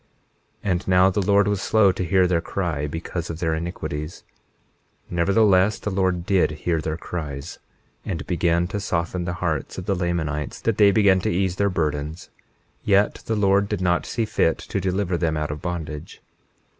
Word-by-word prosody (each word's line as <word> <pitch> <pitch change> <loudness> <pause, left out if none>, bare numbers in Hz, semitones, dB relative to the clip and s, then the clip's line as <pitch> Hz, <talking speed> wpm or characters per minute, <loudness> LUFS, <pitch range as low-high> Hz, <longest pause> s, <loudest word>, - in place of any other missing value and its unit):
21:15 100 - 0
And 90 +1 -1
now 90 0 +5
the 100 +2 0
Lord 100 +1 +3
was 100 -2 0
slow 105 -2 +4
to 95 0 -3
hear 90 +2 +3
their 90 -2 +1
cry 85 -5 -2
because 85 +2 -5
of 80 - -4
their 80 -2 0
iniquities; 80 -1 -5 0.9
nevertheless 100 +3 +3
the 105 - -4
Lord 95 -2 0
did 95 -2 +3
hear 80 +2 -2
their 80 0 -3
cries, 75 -4 -6 0.4
and 85 -5 -4
began 85 0 +1
to 105 - -3
soften 90 -1 -2
the 85 - -2
hearts 75 -4 -2
of 90 - -5
the 100 - +1
Lamanites 80 -6 -2
that 115 -3 0
they 105 -1 +7
began 100 -2 +4
to - - -1
ease 95 +1 0
their 100 0 +2
burdens; 75 -1 -3 0.5
yet 100 0 +2
the 110 - 0
Lord 100 -1 +2
did 105 - -1
not 90 -1 +1
see 115 - -1
fit 80 -5 +1
to 100 - -4
deliver 95 -1 -1
them 80 -2 0
out 75 -1 -2
of 75 0 -6
bondage. 80 -2 -5
90 Hz, 180 wpm, -23 LUFS, 80-100 Hz, 0.9 s, they